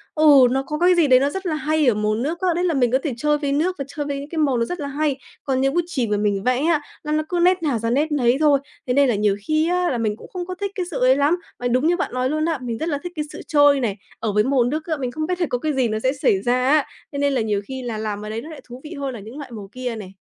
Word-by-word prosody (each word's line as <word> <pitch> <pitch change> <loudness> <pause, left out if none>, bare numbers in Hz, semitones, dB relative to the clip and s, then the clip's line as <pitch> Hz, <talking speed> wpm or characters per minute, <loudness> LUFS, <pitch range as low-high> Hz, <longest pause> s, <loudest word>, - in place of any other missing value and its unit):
ừ, 290 -5 +7
nó 270 +1 0
có 300 0 -3
cái 360 +1 +5
gì 335 -4 +4
đấy 255 -2 +6
nó 275 +2 +1
rất 385 +5 -5
là 320 -3 0
hay 310 -2 +1
ở 240 - +5
màu 210 0 0
nước 295 +9 -2
á, 370 - +1
đấy 355 - 0
là 350 -2 +1
mình 250 -4 +2
có 260 - +4
thể 295 - -2
chơi 300 +2 +1
với 285 -2 -2
nước 330 +6 +1
và 275 - -3
chơi 290 0 -5
với 280 -1 -3
những 285 +1 -8
cái 330 - -6
màu 280 -5 +2
nó 230 - +1
rất 355 +7 -5
là 285 - -3
hay, 285 -1 -1 0.3
còn 265 -2 0
như 270 - +2
bút 345 +4 +2
chì 260 -9 -1
mà 210 -1 0
mình 205 -1 0
vẽ 255 +2 +1
á, 325 -3 +2 0.2
nó 300 - -4
nó 310 0 +1
cứ 355 - 0
nét 365 0 +3
nào 275 -7 0
ra 230 +1 -1
nét 295 +6 +1
nấy 255 -3 +2
thôi, 295 -3 +4 0.3
thế 250 - +1
nên 280 -1 +4
là 235 - +2
nhiều 205 -1 +1
khi 310 +1 +2
á, 360 0 +1
là 250 - -1
mình 215 -2 -1
cũng - - -12
không 360 -1 -4
có 365 +1 -6
thích 400 0 -4
cái 370 - -2
sự - - -3
ấy 255 +1 +5
lắm. 290 +5 +2 0.2
Và 245 - -1
đúng 255 +6 +2
như 350 - +2
bạn 360 - -3
nói 255 +1 0
luôn 310 +2 0
á, 325 -2 0
mình 235 -2 -4
rất 320 +6 -2
là 290 - 0
thích 355 - -5
cái 300 -2 -2
sự - - -8
trôi 290 -2 +5
này, 220 -6 -1 0.2
ở 220 - -1
với 210 +1 +3
màu 265 -2 +2
nước 305 +6 -2
á, 315 -3 -2
mình 255 -3 -3
không 310 +4 -3
biết 360 0 -2
là 345 - +2
có 245 - 0
cái 305 +4 -2
gì 260 -3 +1
nó 215 0 -2
sẽ 260 +3 +1
xảy 270 -9 +1
ra 250 +3 +1
á, 300 -2 +4 0.3
thế 280 - -3
nên 285 0 +2
là 255 - +1
nhiều 210 -2 0
khi 265 -1 -5
là 235 -3 -4
làm 210 -1 -3
ở - - -6
đấy 220 +1 -4
nó 310 - -10
lại 310 - -10
thú 250 +2 -10
vị 315 +3 -8
hơn 275 -3 -4
là 235 - -7
những 220 +7 -10
loại 280 -4 -8
màu 205 -4 -8
kia 250 -2 -4
này. 195 -4 -9
280 Hz, 345 wpm, -22 LUFS, 245-310 Hz, 0.3 s, ừ